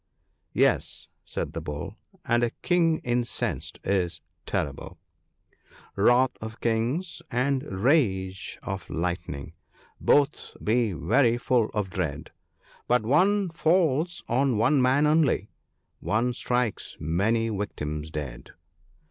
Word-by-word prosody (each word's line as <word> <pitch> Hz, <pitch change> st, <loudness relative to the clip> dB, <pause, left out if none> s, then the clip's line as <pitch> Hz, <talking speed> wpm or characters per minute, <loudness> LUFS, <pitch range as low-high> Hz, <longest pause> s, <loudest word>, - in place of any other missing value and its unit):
' -, -, -48 dB
Yes/ -, -, -1 dB, 0.2 s
said -, -, -4 dB
the -, -, -4 dB
Bull, 75 Hz, +8 st, -6 dB, 0.2 s
* 190 Hz, -2 st, -30 dB
and 120 Hz, 0 st, +2 dB
a 120 Hz, -, +2 dB
king 170 Hz, -3 st, +3 dB
incensed 120 Hz, 0 st, -2 dB
is 90 Hz, -3 st, 0 dB, 0.3 s
terrible, 70 Hz, -1 st, -3 dB, 0.3 s
— -, -, -41 dB
" -, -, -27 dB, 0.2 s
Wrath 120 Hz, +5 st, +4 dB
of 110 Hz, +1 st, -7 dB
kings, 120 Hz, +10 st, -1 dB
and 130 Hz, +2 st, +1 dB
rage 95 Hz, -, +1 dB
of 95 Hz, 0 st, -5 dB
lightning 85 Hz, -4 st, -3 dB, 0.3 s
— -, -, -30 dB
both 145 Hz, 0 st, +2 dB
be 110 Hz, -2 st, +2 dB
very 120 Hz, -, +3 dB
full 120 Hz, -2 st, +1 dB
of 100 Hz, -3 st, -1 dB
dread; 80 Hz, -6 st, -3 dB, 0.6 s
But 125 Hz, -2 st, +3 dB
one 185 Hz, -, +3 dB
falls 165 Hz, 0 st, +1 dB
on 130 Hz, 0 st, +2 dB
one 130 Hz, +6 st, +3 dB
man 130 Hz, +4 st, +4 dB
only 150 Hz, -8 st, +2 dB, 0.3 s
— -, -, -49 dB
one 120 Hz, +4 st, +2 dB
strikes 125 Hz, -3 st, -1 dB
many 110 Hz, +9 st, +1 dB
victims 75 Hz, -7 st, -4 dB
dead." 70 Hz, -6 st, -7 dB
115 Hz, 130 wpm, -26 LUFS, 95-140 Hz, 0.6 s, Wrath